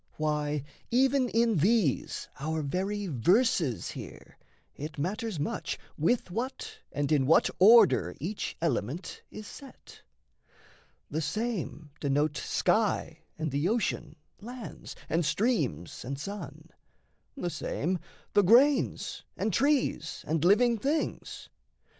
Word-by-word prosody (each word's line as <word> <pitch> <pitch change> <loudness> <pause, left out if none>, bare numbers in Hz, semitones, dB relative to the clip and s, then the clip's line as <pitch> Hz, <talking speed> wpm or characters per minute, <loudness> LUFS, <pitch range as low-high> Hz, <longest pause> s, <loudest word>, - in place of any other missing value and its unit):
Why, 150 -2 -1 0.3
even 260 +1 +3
in 230 -2 +2
these 190 - +1
our 155 +2 -2
very 195 +7 -2
verses 160 - +2
here - - -10 0.4
It 150 +2 -7
matters 200 - -2
much 145 - -2 0.2
with 180 +5 +1
what 270 - -4
and 145 +1 -1
in 140 -4 +3
what 165 - +5
order 195 - +6
Each 195 +8 -4
element 165 +2 -2
is 215 - -9
set: 275 +5 -13 1.1
the 155 +2 -1
same 180 - -3
denote 145 +1 +1
Sky, - - 0 0.2
and 155 -2 -2
the 145 +6 +1
ocean, 210 -8 -1 0.2
lands, 240 +1 -8
and 165 +2 +1
streams, 175 - -1
and 135 +2 -5
sun; 160 -3 -7 0.7
The 175 -9 -2
same, 175 +4 -2 0.3
the 205 - +6
grains, 255 +8 +3 0.2
and 215 - -1
trees, 275 - +1
and 160 0 0
living 225 +5 +4
things. 295 +7 -2
180 Hz, 115 wpm, -29 LUFS, 150-230 Hz, 1.1 s, order